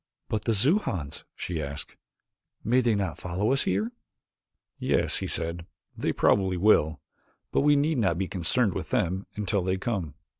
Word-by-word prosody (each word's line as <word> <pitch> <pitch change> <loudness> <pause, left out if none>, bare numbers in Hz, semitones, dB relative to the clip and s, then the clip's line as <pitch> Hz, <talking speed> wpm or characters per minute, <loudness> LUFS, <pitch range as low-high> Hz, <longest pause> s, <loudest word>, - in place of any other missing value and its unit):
"But 110 -1 -2
the 115 - +2
Xujans 105 - +1
?" - - -61
she 85 -3 -3
asked, 70 0 -5 0.7
"may 125 +3 +3
they 115 -3 +2
not 95 -4 -2
follow 95 +6 -1
us 135 - +1
here?" 105 +5 0 0.9
"Yes," - - +1
he - - -3
said, 85 +1 -3 0.3
"they - - -1
probably 95 -2 +2
will. 80 -6 +3 0.5
But - - +2
we 145 +1 +5
need 145 0 +2
not 95 -6 +2
be 95 0 -1
concerned 100 +4 +1
with - - -5
them 95 +3 0
until 105 -1 0
they 95 +1 0
come." 95 - -3
95 Hz, 165 wpm, -27 LUFS, 85-115 Hz, 0.9 s, we